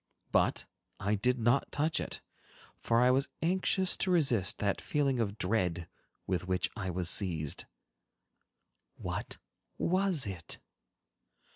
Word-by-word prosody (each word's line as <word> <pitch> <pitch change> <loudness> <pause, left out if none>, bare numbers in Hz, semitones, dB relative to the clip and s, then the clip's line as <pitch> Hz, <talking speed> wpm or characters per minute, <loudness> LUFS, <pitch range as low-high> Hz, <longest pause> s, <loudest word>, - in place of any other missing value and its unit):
But - - +2 0.3
I 100 +2 0
did 125 +5 +2
not 120 +3 +2
touch 155 +2 +1
it, - - -4 0.6
for 115 +1 +2
I 125 +1 +6
was 135 +2 +2 0.2
anxious 185 +2 +2
to 190 - 0
resist 130 - +3
that 100 -1 0
feeling 140 -4 +1
of 105 -2 -1
dread 90 -5 0 0.4
with 90 -1 -1
which 90 0 +1
I 95 -4 -3
was 90 -1 -1
seized. 80 -6 0 1.3
What - - -5 0.4
was 185 -4 +1
it? 95 -5 -6
115 Hz, 125 wpm, -32 LUFS, 95-145 Hz, 1.3 s, I